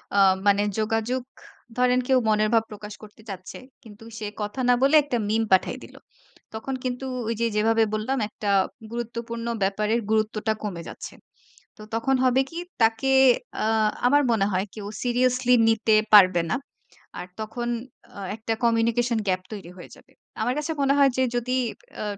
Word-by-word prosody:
আ - - +2 0.3
মানে 200 0 +4 0.2
যোগাযোগ 225 +3 -1 0.6
ধরেন 250 0 +3
কেউ 265 - +4
মনের 215 0 +2
ভাব 225 -1 +4
প্রকাশ 210 0 -8
করতে 215 +1 -14
চাচ্ছে 185 -2 -8 0.3
কিন্তু 215 -1 -14 0.2
সে 215 - -4
কথা 210 +5 -4
না 245 - +7
বলে 275 +3 +4
একটা 275 -4 -2
meme 225 +1 +1
পাঠিয়ে 190 - +3
দিল। - - -14 0.6
তখন 225 +5 -5
কিন্তু 250 +1 -3 0.2
ওই 230 - 0
যে 235 - +3
যেভাবে 225 +1 +3
বললাম 215 +6 -1
একটা 210 -1 -5 0.4
গুরুত্বপূর্ণ 235 0 -5 0.2
ব্যাপারের 210 +4 0
গুরুত্বটা 220 0 0
কমে 185 -5 -4
যাচ্ছে। - - -9 0.6
তো 215 - -12
তখন 230 +4 +1
হবে 255 +1 +4
কি? 335 - -7 0.2
তাকে 225 +4 +2 0.5
আ - - 0 0.4
আমার 290 +3 +4
মনে 200 -3 +2
হয় 185 +1 0
কেও 205 -2 -7 0.2
seriously 250 0 +1 0.2
নিতে 225 -1 +2 0.2
পারবে 185 -4 +7
না। - - +1 0.6
আর 180 - -7
তখন 220 +2 -4 0.5
আ - - -7 0.2
একটা 225 0 -3
communication 235 +1 +2
gap 185 -1 +1
তৈরি 200 -5 -8
হয়ে 175 - -11
যাবে। - - -21 0.3
আমার 245 +3 +1
কাছে 300 +2 -2
মনে 275 0 +3
হয় 280 -1 +5
যে 260 - +3
যদি 245 +1 -1 0.5
আ - - -2
225 Hz, 165 wpm, -24 LUFS, 210-245 Hz, 0.6 s, না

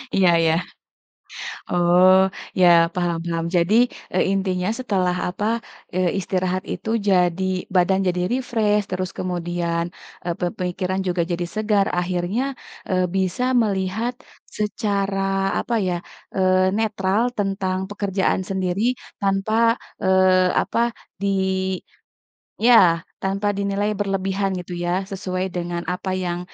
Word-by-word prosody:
Iya 185 -2 +5
iya. 160 -1 +3 1.2
Oh, 180 +1 +5 0.4
iya, 180 -1 +6 0.3
paham 175 -2 0
paham. 165 -1 -2
Jadi, 175 +4 +3 0.4
e - - 0
intinya 190 -1 0
setelah 185 -7 0
apa, 185 +4 -3 0.5
eee, 185 -1 +2
istirahat 185 0 -1
itu - - -6 0.2
jadi 180 0 +3 0.3
badan 185 +1 +4
jadi 180 0 0
refresh, 220 -5 +1
terus 185 0 -2
kemudian, 175 -2 -2 0.4
e - - -5
pe 180 - 0
pemikiran 185 +1 -2
juga 175 -1 +1
jadi 175 0 -1
segar. 210 -2 +2
Akhirnya, 180 +6 -1 0.5
eee, 185 -1 +2
bisa 190 +5 0 0.2
melihat 205 +3 -1 0.5
secara, 200 -2 -1 0.4
apa 235 - -1
ya, 175 - 0 0.4
eee, 185 0 +3
netral 210 -1 +1 0.2
tentang 195 -2 -1
pekerjaan 200 -2 0
sendiri 190 +1 -1 0.4
tanpa, 215 +4 +2 0.3
eee, 185 -1 +4
apa, - - -2 0.4
di 200 - 0 1.3
iya, 190 -8 +6 0.2
tanpa 195 +2 0
dinilai 200 +1 0
berlebihan 195 0 -1
gitu 180 0 -7
ya, 180 +2 0
sesuai 185 -1 -3
dengan 175 -1 -3
apa 190 +1 -4
yang 175 0 -2
185 Hz, 120 wpm, -22 LUFS, 180-200 Hz, 1.3 s, iya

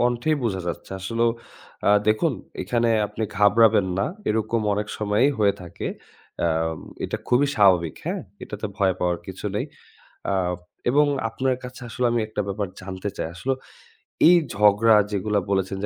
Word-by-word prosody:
কন্ঠেই 120 +6 +2
বোঝা 95 -5 -1
যাচ্ছে। 85 - -5
আসলেও 115 +5 +1 0.6
আ - - +6 0.2
দেখুন 110 0 +3 0.3
এখানে 115 +4 +1 0.2
আপনি 105 +2 -6
ঘাবড়াবেন 105 -1 +5
না। 100 - +1 0.2
এরকম 110 +1 0
অনেক 105 +1 -2
সময়ই 105 +6 +2
হয়ে 100 -2 +3
থাকে। 85 - -6 0.6
আ - - +3 0.6
এটা - - -2
খুবই 130 +4 +4
স্বাভাবিক, 90 -6 +4
হ্যাঁ? - - -2 0.2
এটাতে 105 +1 -5
ভয় 95 -2 +2
পাওয়ার 90 -1 0
কিছু - - -6
নেই। - - 0 0.7
আ - - +1 0.6
এবং 145 +4 +5 0.2
আপনার 130 +2 0
কাছে 125 +1 -9
আসলেও 125 +2 0
আমি 120 -1 +1
একটা 110 -1 -2
ব্যাপার 100 0 -2
জানতে 95 +2 -5
চাই। - - -2
আসলে 135 +7 -1 0.7
এই 175 - +8 0.2
ঝগড়া 105 +2 +5 0.2
যেগুলা 105 +1 0
বলেছেন 95 0 0
যে - - -1
105 Hz, 155 wpm, -24 LUFS, 100-115 Hz, 0.7 s, এই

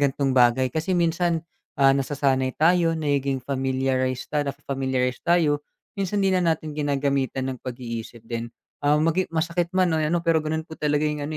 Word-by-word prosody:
gantong 140 -1 +1
bagay 125 0 +4
kasi 160 +4 0
minsan, 170 -1 +1 0.3
ah, 135 -1 +6
nasasanay 135 -1 0
tayo, 165 +1 +4
nagiging 140 -4 0
familiarize 130 -1 -1
na-familiarize 135 -3 -1
tayo, 160 -4 +3 0.4
minsan 195 +1 -2
hindi 195 -1 +2
na 170 -2 +3
natin 155 -1 -6
ginagamitan 140 -2 -1
ng 130 - -9
pag-iisip 115 -2 -7
din, 115 0 -4 0.3
ah, 145 +1 +3
maging 165 +4 +1
masakit 170 +1 -1
man 185 -3 +3
ano 160 +2 +1
pero 165 -1 +3
gano'n 160 +1 -2
po 160 0 -12
talagang 150 0 0
ano 150 +2 -4
145 Hz, 155 wpm, -24 LUFS, 130-165 Hz, 0.4 s, ah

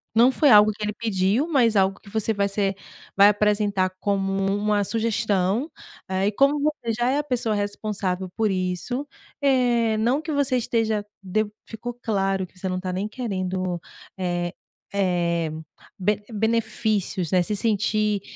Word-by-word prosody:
não 240 +3 +6
foi 290 +1 +3
algo 210 -1 +7
que 210 - -8
ele 210 0 -1
pediu, 215 - +1
mas 250 -9 +3
algo 195 0 +2
que 205 - -16
você 220 +1 0
vai 200 -1 0
ser 200 -1 0 0.4
vai 200 +1 +8
apresentar 205 -2 +1
como 195 -1 0 0.2
uma 205 0 +1
sugestão, 220 - 0 0.4
eh, 190 +1 0
e - - +2
como 280 +6 +3
você 295 -6 -1
já 240 +3 0
é 285 - +1
a 295 - -1
pessoa 245 -5 -1
responsável 205 -2 -2
por 220 -2 +2
isso, 185 +9 -2 0.3
eh, 245 -5 +3
não 240 +6 +2
que 315 0 -5
você 280 -3 +1
esteja 220 -3 0 0.2
de 215 +4 0 0.2
ficou 240 +2 -6
claro 195 -4 0
que 185 - -26
você 190 - -3
não 185 - -1
está 185 0 -3
nem 190 +3 -2
querendo, 185 -6 -3 0.4
eh 175 -2 -2 0.4
eh, 170 -4 0 0.5
be 205 +2 0
benefícios, 215 -4 0
né. 180 -1 +4
Se 210 +4 -2
sentir 215 -1 +1
210 Hz, 160 wpm, -24 LUFS, 190-230 Hz, 0.5 s, vai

